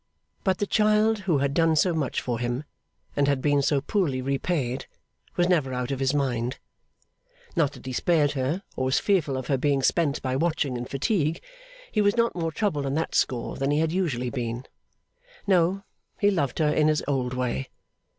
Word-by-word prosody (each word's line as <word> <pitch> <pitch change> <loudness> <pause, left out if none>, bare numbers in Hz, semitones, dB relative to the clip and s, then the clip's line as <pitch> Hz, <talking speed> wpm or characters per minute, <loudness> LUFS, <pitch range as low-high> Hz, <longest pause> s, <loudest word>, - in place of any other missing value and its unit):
But 190 -2 +2
the 205 - 0
child 215 +1 +3
who 160 - +4
had 140 0 0
done 165 0 +3
so 175 +3 +3
much 150 -6 -1
for 120 -2 -2
him 120 +3 -2 0.5
and 140 -1 +2
had 140 -2 +2
been 145 +1 +2
so 140 0 +2
poorly 150 -6 0
repaid, 135 -1 -1 0.5
was 175 0 +2
never 150 -8 +1
out 125 +1 -2
of 135 - -2
his 135 -1 +2
mind. 130 -3 -1 1.0
Not 160 -5 +2
that - - -13
he 130 - -4
spared 150 +1 +2
her, 145 +8 -2
or 130 - -1
was 130 +1 +2
fearful 165 -10 +1
of 130 - -4
her 135 0 0
being 140 0 +1
spent 155 -1 +2
by 130 -1 -1
watching 155 -3 0
and 120 0 -5
fatigue; 160 - 0 0.5
he 215 - +2
was 205 +2 +2
not 230 0 +2
more 165 -2 -2
troubled 155 -6 -1
on 135 - -1
that 160 - -1
score 120 -2 0
than 135 0 0
he 145 - +2
had 160 0 +1
usually 140 -10 -1
been. 120 -1 -3 0.8
No; 190 0 +2 0.4
he 205 0 +4
loved 145 -9 -1
her 155 -2 +3
in 150 - +3
his 155 -1 +2
old 130 -3 -1
way. 125 - -2
145 Hz, 195 wpm, -26 LUFS, 130-170 Hz, 1.0 s, who